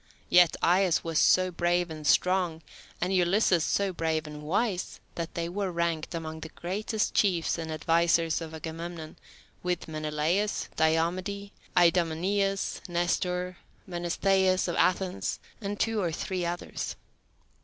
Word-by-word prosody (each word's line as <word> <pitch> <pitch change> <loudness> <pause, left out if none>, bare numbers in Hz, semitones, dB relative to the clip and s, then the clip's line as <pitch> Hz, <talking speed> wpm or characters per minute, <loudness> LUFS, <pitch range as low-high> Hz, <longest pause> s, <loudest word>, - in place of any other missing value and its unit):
Yet 175 -2 +6
Aias 180 0 +3
was 165 -2 0
so 185 0 +4
brave 175 0 +1
and 155 -2 -5
strong, 180 0 +2 0.4
and 180 +2 0
Ulysses 180 -1 +3
so 200 +1 0
brave 160 -2 -1
and 150 0 -8
wise, 185 +4 -1
that 170 -1 -5
they 170 0 -1
were 190 +2 -2
ranked 170 -1 -1
among 160 -1 -5
the 160 - -7
greatest 210 +6 -2
chiefs 175 -4 +2
and 160 -1 -4
advisers 165 +1 +2
of 160 -1 -6
Agamemnon, 160 0 -7 0.4
with 180 -2 -2
Menelaus, 155 +6 -1
Diomede, 180 +5 0 0.3
Idomeneus, 180 +3 +2
Nestor, 180 +1 -1 0.3
Menestheus 185 +2 +1
of 175 - -2
Athens, 185 0 +1 0.2
and 205 0 -4
two 225 -1 +1
or 175 -3 0
three 180 +2 -2
others. 175 +1 -4
175 Hz, 130 wpm, -28 LUFS, 165-185 Hz, 0.4 s, Yet